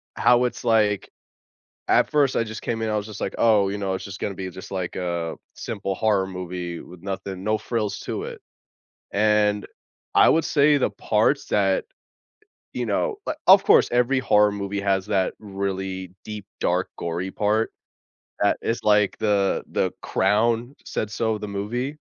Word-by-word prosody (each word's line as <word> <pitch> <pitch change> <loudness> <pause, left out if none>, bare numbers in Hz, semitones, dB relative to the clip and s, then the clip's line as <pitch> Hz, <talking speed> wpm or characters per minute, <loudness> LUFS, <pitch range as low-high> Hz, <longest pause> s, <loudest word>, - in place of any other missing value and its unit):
how 125 0 +4
it's 125 - -4
like 105 -4 +2 0.8
at - - +3
first, 145 -3 +3
I - - +2
just 110 0 -7
came 115 -1 -2
in, 110 - -1
I - - 0
was 105 0 -2
just 105 -2 -8
like, 95 - -2
"Oh, 105 -4 +4
you 100 - -3
know, 95 -1 -1
it's 95 - -6
just 100 -1 -8
gonna 100 - -3
be 95 -1 -5
just, 95 - -10
like, 95 -2 -3
a 85 -2 -2 0.2
simple 100 -3 -4
horror 100 -2 +1
movie 90 -2 -5
with 90 -1 -12
nothing 95 0 -5
no 110 +1 +1
frills 110 -3 -2
to - - -4
it." - - -7 0.7
And, 105 0 +2 0.5
I - - +7
would 160 0 +3
say 145 0 +4
the 135 - +1
parts - - +1
that, 95 -2 +2 0.9
you - - -2
know 470 -4 0
uh, 310 - -1
of 195 +1 +8
course, - - +5
every 125 +2 +3
horror 105 -4 +4
movie 100 0 -3
has 95 -1 0
that 95 -1 0
really 95 -2 -4
deep, 105 -2 -7
dark, 90 +2 +1
gory 85 +3 -3
part, 105 +3 0 0.7
that - - +3
it's 115 - -1
like 105 -1 +3
the 100 -2 +1
the - - +1
crown, 115 +6 +1
said 105 - -3
so 110 0 -1
the 105 0 -6
movie. 120 +8 -3
105 Hz, 175 wpm, -24 LUFS, 95-110 Hz, 0.9 s, of